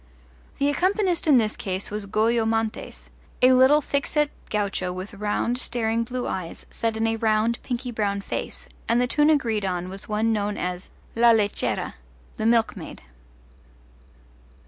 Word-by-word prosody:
The 280 - +1
accompanist 365 +3 +1
in 285 -4 +7
this 220 -2 +1
case 190 -1 -3
was 210 -1 -4
Goyo 225 +3 +2
Montes, 225 0 -3 0.3
a 255 +1 +7
little 260 +4 +6
thick 280 0 -1
set 300 -1 +1 0.2
gaucho 200 -3 -1
with 185 +2 -7
round 210 +4 -1
staring 230 -2 0
blue 250 +1 -4
eyes 175 -3 -5
set 225 -1 -2
in 225 - 0
a 225 0 0
round 220 +1 +1
pinky 250 0 -4
brown 200 -3 -1
face, - - -5 0.2
and 230 +1 +3
the 250 - +3
tune 295 +4 +3
agreed 235 -9 +1
on 180 -1 -2
was 195 +3 -8
one 220 +2 +1
known 205 -1 -1
as 180 0 -4 0.3
La 235 +1 +5
Lechera 210 -2 0 0.4
the 220 - 0
Milkmaid. 230 - 0
225 Hz, 155 wpm, -24 LUFS, 205-250 Hz, 0.4 s, in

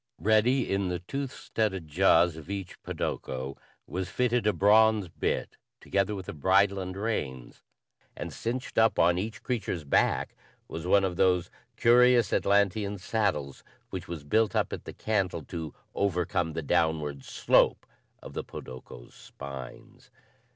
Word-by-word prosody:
Ready 110 - +3
in 95 -1 0
the 90 - -1
tooth 135 +9 -5
studded 95 -7 -2
jaws 85 +1 +4
of 80 +2 -11
each 100 -3 -6
podoko 65 +1 -4 0.3
was 95 0 -4
fitted 125 0 +1
a - - +5
bronze 105 +1 +4
bit - - -2 0.2
together 100 +1 0
with 95 -2 -7
a - - -5
bridle 95 +6 +3
and 95 0 -5
reins; 70 - -4 0.6
and - - -5
cinched 125 +2 -3
up 110 0 +4
on 85 +1 +4
each 110 +3 -5
creature's 105 -9 -2
back 70 - +1 0.3
was 80 +2 -6
one 100 +1 +5
of 90 -2 -1
those 90 -3 +2 0.2
curious 120 0 +5
Atlantean 100 0 +2
saddles, 90 - -2 0.3
which 95 -1 -5
was 85 -4 -6
built 110 +7 +1
up - - 0
at - - -6
the - - -7
cantle 95 -7 -1
to 80 -1 -6 0.2
overcome 90 -4 0
the 80 - -3
downward 80 -4 0
slope - - +2 0.4
of - - -9
the - - -3
podokos' 65 -1 -10
spines. 70 -3 -10
95 Hz, 145 wpm, -28 LUFS, 80-105 Hz, 0.6 s, a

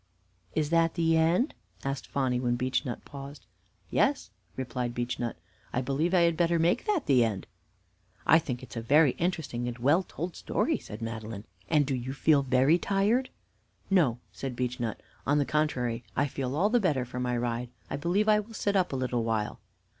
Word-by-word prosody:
"Is 155 0 0
that 165 -1 +3
the 165 -1 +3
end?" 170 - +3 0.3
asked 135 0 -3
Phonny, 130 -3 0
when 120 -1 +1
Beechnut 125 0 -2
paused. 140 0 -9 0.5
"Yes," - - +1 0.3
replied 125 -2 -3
Beechnut, 120 -1 -2 0.3
"I 125 - 0
believe 150 +8 0
I 175 - +5
had 170 -1 +3
better 170 0 +2
make 165 +2 +2
that 410 -9 +1
the 130 -4 +5
end." 105 -4 -2 0.8
"I 165 - +7
think 125 -5 -5
it 130 - -11
is - - -7
a - - -2
very 145 +4 +5
interesting 160 -9 -1
and 120 -1 -4
well 145 +9 +3
told 175 -1 -6
story," - - 0
said 105 +2 -8
Madeline. 110 -2 -5 0.3
"And 150 -2 +4
do 135 - -1
you 130 +1 -3
feel 145 +1 +4
very 135 +5 +3
tired?" 210 +8 +1 0.6
"No," 150 -12 +4
said 135 -2 -5
Beechnut. 120 -2 -2 0.3
"On 145 +2 +3
the 145 - +2
contrary, 125 -7 0
I 145 - +2
feel 135 -1 -3
all 200 +7 +2
the 245 - +4
better 150 - +1
for 125 +1 -6
my 125 -1 0
ride. 120 0 -2 0.2
I - - -3
believe 175 +9 +1
I 210 -1 +5
will 220 +2 -8
sit 205 -1 0
up 185 -2 +2
a - - -2
little 125 -2 -1
while." 110 -2 -1
135 Hz, 190 wpm, -29 LUFS, 125-165 Hz, 0.8 s, I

